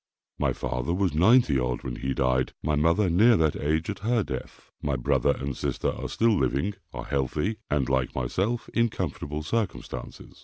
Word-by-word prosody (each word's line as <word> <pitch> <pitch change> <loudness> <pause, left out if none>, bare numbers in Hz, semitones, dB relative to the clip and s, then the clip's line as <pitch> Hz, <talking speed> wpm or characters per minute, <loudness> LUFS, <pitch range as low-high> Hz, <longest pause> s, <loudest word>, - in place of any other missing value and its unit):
My - - +2
father 65 +8 -2
was 95 -3 +1
ninety 90 - +5
odd, 60 0 -2
when - - -4
he 65 0 -2
died, 65 -1 +1
my 75 - 0
mother 85 +7 +3
near 105 +7 +5
that 80 -2 +2
age 80 +3 0
at 105 - -4
her 115 +1 +1
death. 65 -6 -7
My 70 -2 -1
brother 60 - +2
and 70 -1 -4
sister - - -1
are - - -5
still 115 -1 +3
living, 70 +7 0 0.2
are - - -6
healthy, 75 - -1
and, 70 -3 +1
like 65 -1 0
myself, 95 - -1
in 115 0 +3
comfortable 75 -5 -4
circumstances. 105 +3 -4
75 Hz, 180 wpm, -27 LUFS, 65-105 Hz, 0.2 s, ninety